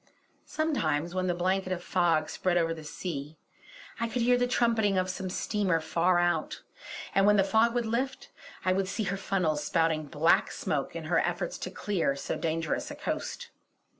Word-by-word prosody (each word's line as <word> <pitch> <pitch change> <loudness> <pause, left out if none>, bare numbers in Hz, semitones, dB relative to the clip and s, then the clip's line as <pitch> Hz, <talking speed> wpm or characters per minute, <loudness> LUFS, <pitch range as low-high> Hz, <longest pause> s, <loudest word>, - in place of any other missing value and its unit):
Sometimes 175 - 0
when 185 0 -1
the 175 - +1
blanket 185 +1 0
of 180 -1 -2
fog 165 -4 +2
spread 180 -1 0
over 165 -1 +2
the 160 -1 -9
sea, 150 -1 -6 0.6
I 230 - 0
could 230 +1 -1
hear 245 +1 +5
the 245 0 +1
trumpeting 225 -5 +2
of 185 0 +1
some 185 0 -5
steamer 190 -2 0
far 170 +3 +2
out; 175 0 0 0.5
and 195 +1 +4
when 210 0 +6
the 195 - +5
fog 225 +4 +3
would 240 -1 +1
lift, 255 +4 -2 0.3
I 185 - +3
would 190 0 0
see 215 +3 -2
her 195 0 -2
funnels 170 -6 0
spouting 160 -1 +1
black 155 +3 +3
smoke - - -2
in - - -4
her - - +2
efforts - - -2
to - - -4
clear 180 -9 -1
so 140 - -3
dangerous 165 -1 -2
a - - -7
coast. - - -4
185 Hz, 185 wpm, -29 LUFS, 165-210 Hz, 0.6 s, when